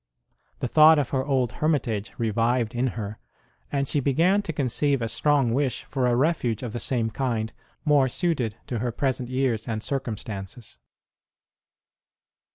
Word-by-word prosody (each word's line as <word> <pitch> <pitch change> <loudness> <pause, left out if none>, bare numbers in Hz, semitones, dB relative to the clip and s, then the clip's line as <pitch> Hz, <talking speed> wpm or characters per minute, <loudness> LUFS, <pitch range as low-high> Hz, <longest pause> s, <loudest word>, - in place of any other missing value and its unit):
The - - 0
thought 155 +4 +7
of 145 -4 0
her 130 -1 +1
old 130 -4 +1
hermi 155 0 +4
tage 110 -5 -4
revived 115 +1 +1
in 120 +2 0
her, 105 -1 -5 0.5
and 140 -1 0
she 145 - +1
began 165 +9 +3
to 200 - -4
conceive 140 0 0
a 115 - -1
strong 135 0 +2
wish 135 -1 0
for 130 -3 -1
a 120 - +2
refuge 130 -5 0
of 115 -3 -5
the 120 - -3
same 115 -1 0
kind 115 -4 -2 0.3
more 145 -3 +4
suited 130 - 0
to 120 - -3
her 120 +1 -1
present 130 0 -2
years 130 -3 0
and 110 -2 -3
circumstances. 110 - -5
125 Hz, 160 wpm, -25 LUFS, 115-140 Hz, 0.5 s, thought